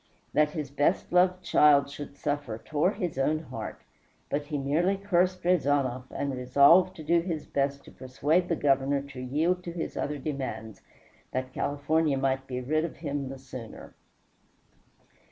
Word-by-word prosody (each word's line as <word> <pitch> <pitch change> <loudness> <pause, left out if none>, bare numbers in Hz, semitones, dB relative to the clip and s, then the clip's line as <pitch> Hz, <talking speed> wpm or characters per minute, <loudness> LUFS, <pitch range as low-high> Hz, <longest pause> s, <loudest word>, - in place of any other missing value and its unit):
That 150 0 +4
his 150 -4 -4
best 145 +6 0
loved 180 0 +3
child 145 -4 +5
should 140 0 -9
suffer 145 -6 -2
tore 155 - 0
his 180 -9 -3
own 150 +3 +2
heart, 130 -8 -7 0.5
but 145 0 -1
he 150 -1 -2
merely 160 +8 +1
cursed 185 -2 +1
Rezanov 140 -7 +1
and 140 -1 -3
resolved 140 +9 +5
to 160 - -9
do 170 +2 +3
his 165 -3 -4
best 140 0 -1
to - - -13
persuade 145 +7 0
the 170 - +2
Governor 140 -1 +1
to 130 -2 -8
yield 160 +8 0
to 170 - -5
his 170 -1 -5
other 145 +1 -2
demands, 130 -6 -5 0.5
that 130 0 -3
California 145 +1 0
might 135 0 0
be 125 -1 -4
rid 155 +5 0
of 165 - -4
him 145 -4 -3
the 135 - -7
sooner. 130 -4 -10
145 Hz, 160 wpm, -28 LUFS, 135-165 Hz, 0.5 s, child